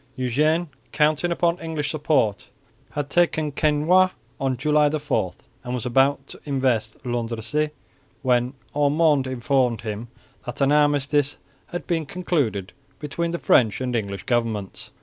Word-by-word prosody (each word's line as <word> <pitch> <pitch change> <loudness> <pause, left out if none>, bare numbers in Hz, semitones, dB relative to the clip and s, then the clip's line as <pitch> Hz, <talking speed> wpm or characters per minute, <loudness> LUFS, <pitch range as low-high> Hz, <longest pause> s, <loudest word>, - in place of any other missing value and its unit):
Eugene, 150 +7 +1 0.2
counting 155 +3 +2
upon 170 0 +1
English 160 -3 -3
support, 140 -9 0 0.4
had 145 -1 -2
taken 160 -2 +1
Quesnoy 155 +6 +3 0.3
on 135 -2 0
July 150 +3 +3
4, 150 0 -1 0.3
and 125 +1 -3
was 125 - -4
about 135 +3 +2
to - - -11
invest 130 -6 0
Landrecies, 120 +4 -1 0.5
when 125 0 +2 0.2
Ormonde 145 -1 +3
informed 125 -1 +1
him 110 +1 -5 0.4
that 125 - -6
an 140 0 +3
armistice 145 -1 +2 0.3
had 175 - -6
been 165 -4 -1
concluded 140 - -1 0.2
between 155 +3 -3
the 170 - -2
French 115 -9 +3
and 125 -1 -2
English 100 -3 -3
governments. 115 -5 -2
140 Hz, 130 wpm, -23 LUFS, 120-155 Hz, 0.5 s, Quesnoy